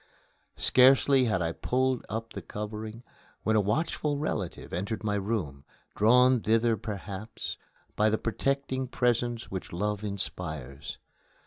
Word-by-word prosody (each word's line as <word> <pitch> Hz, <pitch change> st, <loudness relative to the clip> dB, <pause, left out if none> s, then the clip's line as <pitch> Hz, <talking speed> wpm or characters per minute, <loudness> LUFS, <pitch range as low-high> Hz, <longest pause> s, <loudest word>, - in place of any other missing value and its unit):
Scarcely 130 Hz, +1 st, +5 dB
had 105 Hz, -6 st, +1 dB
I 85 Hz, -, 0 dB
pulled 130 Hz, +6 st, 0 dB
up 115 Hz, +1 st, -4 dB
the -, -, -5 dB
covering 110 Hz, +2 st, -6 dB, 0.4 s
when 110 Hz, -, +2 dB
a 105 Hz, -, +5 dB
watchful 145 Hz, -, 0 dB
relative 105 Hz, -, -3 dB
entered 100 Hz, +6 st, -3 dB
my 105 Hz, -1 st, 0 dB
room, 95 Hz, -10 st, -2 dB, 0.3 s
drawn 125 Hz, +3 st, +5 dB
thither 115 Hz, +1 st, +3 dB
perhaps 105 Hz, 0 st, -6 dB, 0.4 s
by 105 Hz, +1 st, +4 dB
that 110 Hz, -, -1 dB
protecting 130 Hz, +2 st, -1 dB
prescience 120 Hz, -1 st, 0 dB
which 95 Hz, -1 st, -5 dB
love 105 Hz, +3 st, -2 dB
inspires. 80 Hz, -9 st, -5 dB
110 Hz, 125 wpm, -29 LUFS, 100-125 Hz, 0.4 s, Scarcely